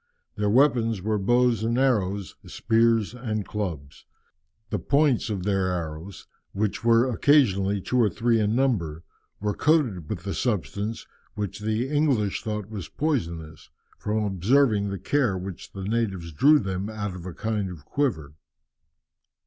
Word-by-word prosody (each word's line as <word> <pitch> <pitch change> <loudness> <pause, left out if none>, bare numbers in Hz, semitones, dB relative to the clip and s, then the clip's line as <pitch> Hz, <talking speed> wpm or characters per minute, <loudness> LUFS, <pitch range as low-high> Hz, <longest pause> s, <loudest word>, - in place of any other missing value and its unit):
Their 105 0 -1
weapons 115 -3 +3
were 110 0 0
bows 120 +2 +2
and 115 +2 0
arrows, 100 -7 0
spears 115 -1 +2
and 110 -5 -3
clubs. 80 -10 -5 0.6
The 105 - 0
points 140 - +2
of 100 -4 -3
their 95 -1 +1
arrows, 85 +2 -5 0.3
which 105 +2 -2
were 115 +2 +4
occasionally 105 -7 +3
two 125 +6 0
or 110 - +4
three 115 +2 +1
in 105 +1 +1
number, 90 - 0 0.4
were 105 0 -1
coated 120 - +1
with - - -5
a 100 - -2
substance 105 - -2 0.3
which 100 -1 -4
the 110 +4 -1
English 135 -9 +1
thought 105 -2 -4
was 100 -5 -6
poisonous, 85 - -3 0.3
from 105 +1 -1
observing 105 +2 +2
the 100 - -3
care 120 -1 +1
with 90 - -6
which - - -14
the 95 - -7
natives 100 -5 -2
drew 145 - +5
them 95 -4 -3
out 105 -3 -4
of 90 0 -8
a 90 - -6
kind 105 -3 -2
of 80 -5 -10
quiver. 80 - -1
105 Hz, 150 wpm, -25 LUFS, 95-120 Hz, 0.6 s, drew